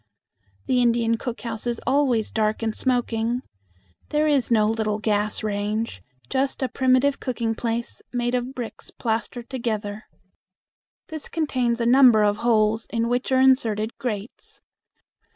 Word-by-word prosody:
The 250 -1 +2
Indian 230 -1 +2
cook 240 +1 -5
house 230 -1 -4
is 235 -1 -1
always 260 -6 +2
dark 215 0 0
and 220 -1 -1
smoky. 240 -2 0 0.7
There 300 +1 +2
is 285 -4 +2
no 215 -3 +4
little 215 -1 0
gas 210 0 -1
range; 210 - -2 0.3
just 270 0 -1
a - - +2
primitive 260 +3 +2
cooking 235 -3 -2
place 230 +1 -3
made 240 0 -1
of 250 +2 -2
bricks 240 -3 -7
plastered 235 +1 -3
together. 215 -5 -3 1.0
This 315 -2 -5
contains 255 -7 0
a 235 - 0
number 245 -3 +6
of 205 0 +2
holes 220 -1 +2
in 230 0 -1
which 245 +2 -1
are 260 - +4
inserted 230 -5 +2
grates. 215 -3 -5
235 Hz, 140 wpm, -24 LUFS, 220-255 Hz, 1.0 s, number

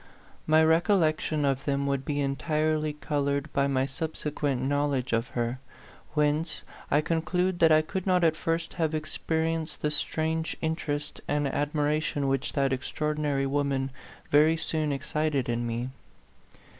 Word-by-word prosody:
My 155 +1 +6
rec 160 +2 +4
ollection 155 -6 +2
of 135 0 0
them 140 -1 0
would 140 -1 0
be 145 0 -1
entirely 155 +2 0
colored 140 -1 -1
by 140 0 +2
my 135 -1 +1
subsequent 145 -2 -2
knowledge 140 -3 0
of 115 +1 +1
her; 120 +2 -1 0.6
whence 150 +2 +1 0.3
I 145 - +4
conclude 175 +3 0
that 165 -1 +6
I 155 0 +6
could 190 +4 -4
not 180 -1 +3
at 160 -1 +4
first 165 +1 -2
have 160 -2 0
ex 155 0 -4
perienced 160 -1 -1
the 150 - +1
strange 160 +1 -1
interest 160 -2 -3
and 145 0 +1
admira 145 +2 0
tion 145 -3 -1
which 135 0 0
that 135 -2 +2
extraordinary 145 +1 -1
woman 135 -1 0 0.4
very 155 +3 +5
soon 155 -2 -1
excited 145 -1 -1
in 120 0 -1
me. 120 +2 -2
150 Hz, 150 wpm, -28 LUFS, 140-160 Hz, 0.6 s, My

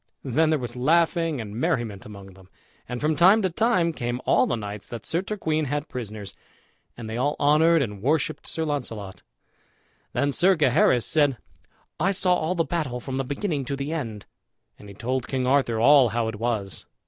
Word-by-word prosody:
Then 150 +5 +1
there 155 - +2
was 120 -3 -6
laughing 165 +3 +1
and 105 -2 -7
merriment 115 -4 -2
among 100 -2 -11
them; 95 0 -18 0.4
and 125 0 -4
from 155 +3 0
time 195 +6 +5
to 185 - 0
time 180 -4 +1
came 120 -3 -3
all - - +3
the - - 0
knights 105 -2 -6
that 120 - -7
Sir 165 +2 0
Turquine 160 -7 -2
had 145 +2 -3
prisoners, 110 -5 -7 0.6
and 115 -2 -7
they 110 +1 -4
all 145 +4 0
honored 155 +2 +4
and 105 -5 -6
worshipped 150 +4 -1
Sir 160 - -3
Launcelot. 115 -10 -4 0.9
Then 145 0 +1
Sir 185 +6 +4
Gaheris 125 -5 +3
said, 145 -4 +2 0.6
"I 190 +5 +2
saw 185 -1 +2
all 175 +1 -1
the 170 - +2
battle 145 -6 -2
from 130 +1 -5
the 135 - 0
beginning 145 +2 -2
to 140 - -3
the 140 +3 -4
end," 115 -10 -5 0.5
and 105 - -12
he 100 - -11
told 130 +4 -3
King 130 -2 -1
Arthur 130 -4 +2
all 135 +1 +6
how 115 0 -1
it 110 - -6
was. 105 -8 -3
135 Hz, 190 wpm, -25 LUFS, 115-160 Hz, 0.9 s, all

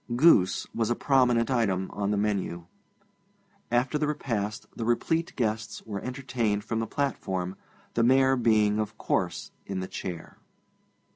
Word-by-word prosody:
Goose 120 - +5
was 115 -1 0
a 120 - +2
prominent 125 -3 +3
item 95 -7 +1
in 100 -1 -1
the 105 - +1
menu. 100 -5 -1 1.0
After 125 +5 +1
the 150 - +1
repast 115 -7 -2
the 115 - -4
replete 160 +8 0
guests 110 -3 -2
were 100 -2 -5
entertained 125 -5 -2
from 115 0 -2
the 115 - -2
platform, 95 -10 -2 0.4
the 115 - +1
Mayor 130 +2 +5
being, 110 -3 +3
of 105 -1 -3
course, - - -1 0.2
in 95 -1 -3
the 95 - -4
chair. 90 -4 -7
115 Hz, 145 wpm, -27 LUFS, 100-125 Hz, 1.0 s, Goose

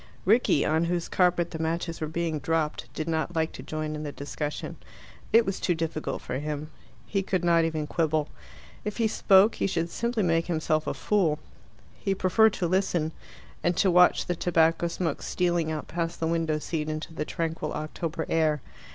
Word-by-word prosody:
Rickie, 215 - +4
on 160 +2 +2
whose 175 0 -1
carpet 175 -2 +2
the 160 - -5
matches 165 +1 -2
were 155 - -1
being 160 -1 -2
dropped, 150 -5 -1
did 155 - -3
not 165 +1 -1
like 160 0 +1
to - - -9
join 155 0 -4
in 150 - -4
the 150 -1 -4
discussion. 145 +1 -5 0.5
It 230 0 +6
was 195 - -2
too 175 - +1
difficult 160 -1 -3
for 130 - -3
him. 150 +1 -4 0.3
He 195 - 0
could 185 -2 -1
not 170 -1 +4
even 160 -2 -1
quibble. 155 -1 0 0.6
If 210 -1 -4
he 230 -2 +3
spoke, 200 0 +5
he - - -1
should 170 -3 -1
simply 235 -2 -1
make 165 -1 +2
himself 155 -2 0
a - - -1
fool. 180 -8 +1 0.6
He 195 - 0
preferred 205 +4 +4
to 175 - -1
listen, 175 -3 +1 0.5
and 175 0 +1
to 190 - +4
watch 180 +1 +5
the 175 - -1
tobacco 165 0 +2
smoke 170 -3 -2
stealing 175 -3 0
out 155 -1 -4
past 165 -1 -3
the 165 - 0
window 165 -2 +1
seat 155 0 -3
into 155 +1 -5
the 150 - -2
tranquil 160 -1 -3
October 160 +1 -4
air. 155 -2 +2
165 Hz, 185 wpm, -27 LUFS, 155-180 Hz, 0.6 s, It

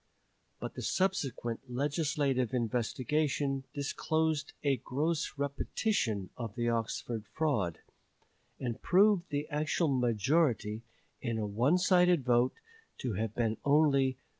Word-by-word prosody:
But - - -5
the - - -6
subsequent 135 -10 -1
legislative 140 -2 0
investigation 135 +4 0
disclosed 155 +2 -1
a 140 -2 +2
gross 155 +5 -2
repetition 140 - -1
of 115 -4 -6
the 120 -1 0
Oxford 115 -1 -2
fraud, 115 - 0 0.8
and 120 -3 -4
proved 195 -1 +4
the 145 +1 -2
actual 155 +2 0
majority, 120 -2 +1 0.4
in 115 -3 -2
a 110 - -1
onesided 175 - +3
vote, 120 0 +3 0.4
to 125 -4 -3
have 110 +2 -2
been 115 -2 0
only 140 -2 +4
3423. - - -30
135 Hz, 115 wpm, -32 LUFS, 120-155 Hz, 0.8 s, proved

